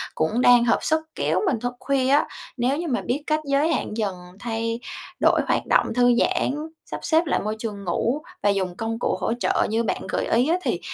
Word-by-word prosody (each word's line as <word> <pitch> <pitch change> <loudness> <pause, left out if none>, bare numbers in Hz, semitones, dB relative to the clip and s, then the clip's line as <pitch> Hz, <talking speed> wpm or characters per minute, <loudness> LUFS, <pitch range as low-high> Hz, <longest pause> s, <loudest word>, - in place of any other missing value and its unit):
cũng 215 +10 0
đang 245 -1 +6
hợp 230 - +3
sức 315 0 +2 0.2
kéo - - +1
mình 265 - +1
thức 245 +2 -3
khuya 265 0 0
á. 285 +2 +4 0.3
Nếu 255 +3 +1
như 340 +1 -3
mà 250 -4 0
biết 280 +4 -2
cách 305 0 +2
giới 285 +4 +2
hạn 215 - -3
dần 205 -4 -1 0.2
thay 230 0 -2 0.4
đổi - - +4
hoạt - - +1
động - - +2
thư 245 +1 +4
giãn, 255 +2 +1 0.3
sắp - - -6
xếp 325 +1 +3
lại 300 - +1
môi 215 +1 -3
trường 210 -3 -5
ngủ 235 - 0 0.2
và 205 - +4
dùng 190 -3 0
công 225 0 -3
cụ - - 0
hỗ - - 0
trợ - - +1
như 225 +2 +1
bạn 220 - -2
gợi - - -1
ý 240 +4 +2
á, 345 - +3
thì - - -1
245 Hz, 225 wpm, -24 LUFS, 225-275 Hz, 0.4 s, đang